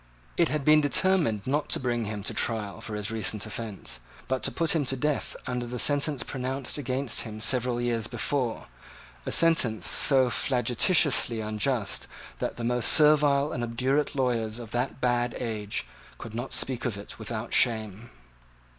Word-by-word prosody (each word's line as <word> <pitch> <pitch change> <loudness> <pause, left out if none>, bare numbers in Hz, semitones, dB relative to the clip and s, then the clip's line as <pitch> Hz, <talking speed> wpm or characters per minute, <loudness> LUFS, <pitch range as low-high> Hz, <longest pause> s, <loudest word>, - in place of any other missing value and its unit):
It 170 - +3
had 150 -3 -2
been 155 0 +6
determined 145 - +2
not 145 +3 -1
to - - +1
bring 120 -3 -1
him 105 -1 -5
to - - -3
trial 105 -4 -2
for 110 - -5
his 105 0 -3
recent 110 -2 -2
offence, 105 - -6 0.3
but 130 0 -1
to - - -1
put 165 -2 +1
him 155 - +2
to 135 - +1
death 150 +2 -1
under 125 -1 -3
the 125 +1 -5
sentence 145 0 +2
pronounced 130 +1 -3
against 130 -1 -2
him 110 -2 -6
several 125 +1 +1
years 115 -2 -1
before, 120 0 -1 0.6
a - - -1
sentence 145 -10 +3
so 130 -3 +3
flagitiously 125 +3 +2
unjust 110 +1 -1 0.3
that - - -2
the 120 - -5
most 125 0 +2
servile 150 -1 +4
and 120 - -3
obdurate 130 +6 0
lawyers 120 -4 0
of 115 -2 -9
that 125 +3 -2
bad 120 -1 +1
age 110 -4 -3 0.3
could 115 - -9
not 120 +3 -4
speak 130 -2 0
of 115 -5 -2
it 100 - -9
without 110 +1 -5
shame. 110 -2 +1
120 Hz, 165 wpm, -27 LUFS, 110-135 Hz, 0.6 s, been